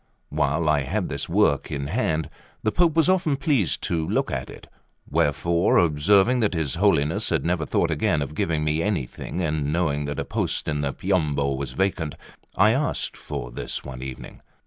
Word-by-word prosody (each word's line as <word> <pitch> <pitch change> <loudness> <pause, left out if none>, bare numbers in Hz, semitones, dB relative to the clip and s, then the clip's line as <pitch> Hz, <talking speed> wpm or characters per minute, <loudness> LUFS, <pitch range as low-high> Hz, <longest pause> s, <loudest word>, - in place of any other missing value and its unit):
While 85 - 0
I 75 -2 +3
had 65 - -2
this - - -4
work - - +2
in 70 -1 -3
hand, 80 - -1 0.4
the 110 - +1
Pope 170 +1 +2
was 165 -1 +4
often 185 -6 +2
pleased 135 - +1
to 80 -2 -1
look - - 0
at - - -3
it; - - -11 0.4
wherefore, 85 +2 +2
observing 95 - +4
that 105 -5 +1
his 80 -4 -1
Holiness 80 -5 +2
had - - 0
never 85 -3 0
thought - - +1
again 75 -2 +1
of 70 - -7
giving 75 0 0
me 75 +1 +1
anything, 90 - -3
and 75 -2 -1
knowing 75 -3 0
that 70 - -4
a - - -2
post - - -2
in 75 -1 -1
the 70 -1 -1
Piombo 70 -4 0
was 70 +1 -5
vacant, 90 -6 -1 0.4
I 105 +3 +5
asked 140 +4 -1
for - - -6
this - - -4
one 65 -2 -8
evening. 65 -1 -8
80 Hz, 185 wpm, -24 LUFS, 75-100 Hz, 0.4 s, I